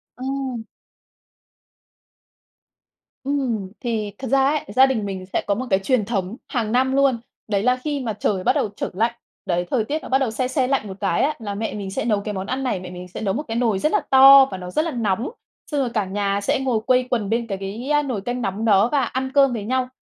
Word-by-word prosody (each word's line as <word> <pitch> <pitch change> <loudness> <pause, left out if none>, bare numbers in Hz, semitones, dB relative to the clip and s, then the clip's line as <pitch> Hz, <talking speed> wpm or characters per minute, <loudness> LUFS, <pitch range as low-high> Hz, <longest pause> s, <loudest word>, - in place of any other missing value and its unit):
Ờ. 255 - -9 3.0
Ừm. 255 -9 -2
Thì 220 -4 -2
thật 265 - -6
ra 270 +3 +3
ấy 295 +2 0
gia 265 - +8
đình 250 -6 -1
mình 190 -2 -5
sẽ - - +1
có 200 - +2
một 255 +5 -3
cái 190 - +3
truyền 220 +1 +1
thống 200 -1 -3
hàng 225 -4 -2
năm 260 +2 +2
luôn. 275 -3 +3 0.3
Đấy 205 -2 0
là 250 +1 +3
khi 295 -2 -1
mà 235 -5 -3
trời 200 -2 -1
bắt - - +3
đầu - - +1
trở - - -3
lạnh, 225 +5 +1 0.3
đấy, 175 0 0
thời 230 -5 +1
tiết 305 +6 -2
nó - - -9
bắt 265 - +4
đầu 265 -4 0
se 250 +3 -1
se 260 0 0
lạnh 265 -5 0
một 190 -1 -8
cái 195 -4 +1
á 295 +3 +2
là 205 -3 -5
mẹ 220 +2 -3
mình 200 -2 -5
sẽ - - -2
nấu 210 -3 +1
cái 210 +1 -4
món 190 0 -4
ăn 260 +4 -2
này. 250 -7 -1
Mẹ 180 0 -8
mình 180 0 -8
sẽ 180 - -8
nấu 200 -3 0
một 290 - -2
cái 225 - -2
nồi 225 -5 +1
rất 305 - +1
là 420 - +2
to 270 +1 +9
và 190 - -4
nó 180 -1 -7
rất 310 - +1
là 330 - -2
nóng, 225 -2 -1 0.4
xong 295 - 0
rồi 255 - 0
cả 215 -3 0
nhà 200 +1 -1
sẽ 200 - +1
ngồi 255 -4 0
quây 255 0 +4
quần 220 -5 -1
bên 230 +1 0
cái 195 -3 -3
cái 240 +10 -1
nồi 245 -7 -3
canh 245 +4 -3
nóng 205 +1 -2
đó 210 +1 +4
và 285 -2 +2
ăn 260 0 -3
cơm 275 -3 +5
với 220 -3 -3
nhau. 255 +3 -1
230 Hz, 250 wpm, -22 LUFS, 200-265 Hz, 3.0 s, to